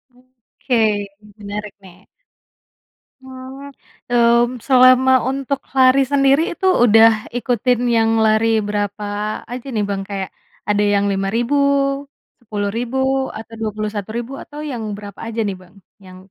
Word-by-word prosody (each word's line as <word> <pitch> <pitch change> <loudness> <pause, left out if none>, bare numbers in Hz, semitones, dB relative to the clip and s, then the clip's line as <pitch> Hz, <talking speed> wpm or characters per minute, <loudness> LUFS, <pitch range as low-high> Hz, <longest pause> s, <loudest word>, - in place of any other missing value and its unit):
Oke, 235 -4 -2 0.3
menarik 210 0 -7
nih. 185 0 -17 1.2
Mhm, 265 +2 -10 0.4
mmm, 235 0 +3
selama 255 0 +6 0.2
untuk 275 0 -2 0.2
lari 260 +1 +5
sendiri 275 +1 +4
itu 380 - -5 0.2
udah 225 -1 +7 0.3
ikutin 245 0 0 0.2
yang 225 0 +3 0.2
lari 220 +1 +3 0.2
berapa 205 0 -3 0.5
aja 245 +1 -6
nih, 215 - 0
Bang? 195 -1 -2
Kayak 195 -2 -4 0.4
ada 205 0 +2
yang 200 0 +1
5.000, 225 +8 -1 0.9
10.000, 225 +4 -3 0.4
atau 225 +1 -11
21.000 215 +3 -4
atau 295 - -11
yang 235 -3 -5
berapa 205 -2 -11
aja 230 0 -5
nih, 195 - -3
Bang? 180 +1 -20 0.3
Yang 185 0 -13
230 Hz, 120 wpm, -19 LUFS, 205-255 Hz, 1.2 s, udah